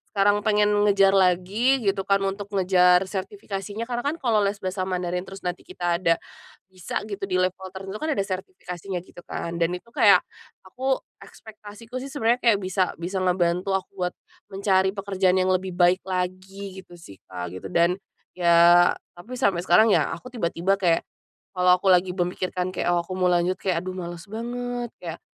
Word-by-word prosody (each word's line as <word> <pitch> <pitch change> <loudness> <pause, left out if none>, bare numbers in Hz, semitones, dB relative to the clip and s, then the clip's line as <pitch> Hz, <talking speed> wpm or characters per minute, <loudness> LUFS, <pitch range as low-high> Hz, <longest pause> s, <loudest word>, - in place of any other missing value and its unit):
sekarang 205 +1 +4
pengen 210 0 +3 0.2
ngejar 195 -1 +5
lagi 195 +7 +3
gitu 195 -1 0
kan, 195 0 +2
untuk 195 +1 -3
ngejar 180 -1 +4
sertifikasinya, 200 - -5
karena 240 0 -3
kan 285 +6 -1
kalau 235 -9 +1
les 200 0 +1
bahasa 185 0 -2
Mandarin 180 0 -2
terus 195 0 -10
nanti 180 0 -3
kita 175 -2 -1
ada, 165 -2 +3 0.6
bisa 185 +2 -4
gitu 205 -2 -6
di 185 - -2
level 185 +1 0
tertentu, 195 +2 -7
kan 310 -3 -1
ada 200 - 0
sertifikasinya 185 -1 -6
gitu 175 - -15
kan. 170 0 -4
Dan 170 +1 +1
itu 230 +6 -12
kayak, 200 -6 +5 0.4
aku 260 +7 -2 0.2
ekspektasiku 220 +3 -10
sih 270 - -6
sebenarnya 245 -3 +1
kayak 225 -5 +3
bisa 185 0 0
bisa 185 +3 -4
ngebantu 180 +1 +1
aku 190 0 -4 0.2
buat - - -7 0.4
mencari 190 0 +2
pekerjaan 190 -2 +1
yang 185 0 +2
lebih 185 -1 -1
baik 180 +1 +4
lagi, 190 +1 -4
gitu 175 -2 -14
sih 165 - -14
Kak, 90 -1 -6
gitu 95 - -7
dan, 170 +3 +2 0.4
ya, 170 0 +6 0.3
tapi 245 +8 -8
sampai 195 -7 +1
sekarang 215 +5 +6
ya, - - +3
aku 255 - -12
tiba-tiba 195 -2 0
kayak, 170 -3 +2 0.5
kalau 180 -1 +4
aku 190 +1 +2
lagi 180 0 +3
memikirkan 180 0 -2
kayak, 185 - -3
"Oh 170 -1 +1
aku 185 - -7
mau 180 - +3
lanjut, 175 +2 +1
kayak 180 -2 -1
aduh 185 - -4
males 170 -1 -6
banget." 245 +1 -4
kayak, 170 -2 -6
190 Hz, 180 wpm, -24 LUFS, 180-205 Hz, 0.6 s, ya